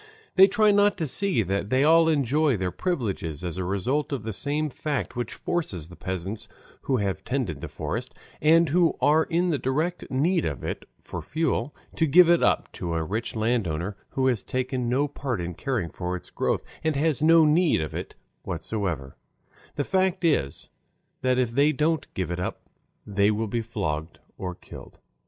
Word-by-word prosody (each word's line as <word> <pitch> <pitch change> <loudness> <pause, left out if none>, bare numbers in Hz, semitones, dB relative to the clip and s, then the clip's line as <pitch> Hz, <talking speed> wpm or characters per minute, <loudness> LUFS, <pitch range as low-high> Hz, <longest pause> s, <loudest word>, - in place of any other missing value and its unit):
They 190 0 +8
try 210 +1 +4
not 205 0 +4
to 165 - -1
see 175 - +1
that 100 +2 -2
they 130 +3 +3
all 165 +2 +6
enjoy 145 -2 +2
their 90 -1 -2
privileges 95 - -2
as 90 -1 -3
a 95 - -1
result 120 +12 -1
of 135 -6 -3
the 110 0 -4
same 150 +6 -1
fact 145 0 -3
which 120 -2 -4
forces 95 - -3
the 90 - -11
peasants 95 +4 -5 0.3
who 130 - 0
have 100 -3 -2
tended 115 - -2
the - - -5
forest, - - -4 0.3
and 165 +2 +5
who 170 +2 +3
are 150 +4 +4
in 175 +1 +1
the 145 - 0
direct 155 +8 -1
need 165 +6 +1
of 70 - -3
it - - -4 0.2
for - - -6
fuel, 150 -4 -1 0.2
to 160 - +3
give 170 +4 +7
it 170 - +4
up - - +2
to 85 -1 -4
a 80 - 0
rich 110 +9 -3
landowner 105 -5 -1
who 130 - -1
has 125 -5 +1
taken 130 -1 -2
no 135 +4 +2
part 135 -6 -3
in 85 0 -4
caring 120 - -2
for 90 0 -3
its 90 - -9
growth - - 0 0.2
and 160 -1 +1
has 150 0 +1
no 165 +1 +6
need 160 - +3
of 80 -1 -4
it - - -6 0.3
whatever 85 - -3 0.6
the 145 - 0
fact, 190 +2 +1
that - - -1
is, 70 - -1 0.5
that 130 -1 +2
if 125 -2 +1
they 140 +5 +4
don't 155 +2 0
give 90 -2 -2
it 85 - -3
up 90 - -4 0.4
they 100 0 +2
will 110 +1 0
be 115 +3 -1
flogged 80 -8 -3 0.2
or 90 -2 -5
killed. - - -12
130 Hz, 190 wpm, -26 LUFS, 95-155 Hz, 0.6 s, They